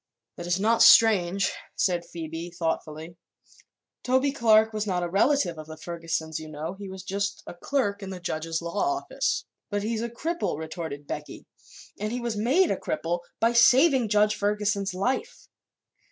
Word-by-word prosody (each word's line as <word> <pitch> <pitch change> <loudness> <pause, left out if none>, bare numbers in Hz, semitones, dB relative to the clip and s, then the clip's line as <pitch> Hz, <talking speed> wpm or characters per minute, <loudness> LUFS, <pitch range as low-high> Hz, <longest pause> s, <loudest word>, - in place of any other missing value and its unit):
"That 175 - -7
is 175 +2 +1
not 225 +3 +2
strange," 200 -5 +6 0.2
said 175 -2 +1
Phoebe, 165 0 -6
thoughtfully. 165 -1 -4 0.8
"Toby 260 +2 +2
Clark 220 -4 +4
was 215 0 -2
not 180 -2 0
a - - -1
relative 195 - +1
of 155 - -9
the 155 0 -9
Fergusons, 165 -1 -4
you 155 0 -9
know; 155 +3 -5
he 195 0 -9
was 190 0 -8
just 200 +1 -3
a - - -8
clerk 205 +1 -1
in 195 - -6
the 185 -1 -6
judge's 165 -1 -3
law 170 +5 -3 0.2
office." - - -2 0.2
"But 205 -1 -2
he's 220 +1 -2
a 235 - -3
cripple," 325 - -3
retorted 160 -2 -6
Becky, - - -7 0.5
"and 210 +1 -2
he 245 - -2
was 235 -2 -3
made 260 - +2
a - - 0
cripple 175 - -2 0.2
by 230 +2 +3
saving 255 +1 +5
Judge 210 +1 +3
Ferguson's 205 -2 -1
life." 260 - -2
200 Hz, 170 wpm, -26 LUFS, 170-230 Hz, 0.8 s, strange